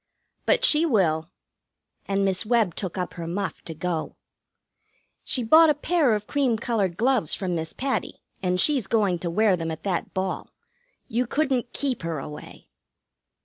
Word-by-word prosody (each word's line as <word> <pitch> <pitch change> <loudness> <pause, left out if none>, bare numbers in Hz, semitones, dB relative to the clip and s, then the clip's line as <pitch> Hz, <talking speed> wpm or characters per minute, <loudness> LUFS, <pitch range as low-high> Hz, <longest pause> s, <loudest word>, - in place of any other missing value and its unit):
"But - - +4
she 300 +1 +5
will." 175 - +1 0.8
And 195 0 +1
Miss 190 0 0
Webb 225 -5 +2
took 190 0 -5
up 180 - -3
her 170 -1 -6
muff 190 +3 -3
to 165 - -6
go. 165 0 -3 1.1
"She 250 - 0
bought 315 +7 +7
a 300 - +3
pair 295 -5 +2
of 210 0 -4
cream 265 -4 +1
colored 215 -6 0
kid - - -24
gloves 245 - +2
from 185 -3 -2
Miss 160 -1 -3
Patty, 270 0 -3 0.2
and 180 -1 0
she's 265 -3 +2
going 200 -6 +1
to 170 - -2
wear 210 +2 +3
them 165 -2 -4
at 160 0 -6
that 185 -4 -2
ball. 190 0 -2 0.6
You 240 +2 -1
couldn't 265 -4 0
keep 275 -3 -2
her 165 -2 -3
away." 150 +2 -9
200 Hz, 170 wpm, -25 LUFS, 175-250 Hz, 1.1 s, bought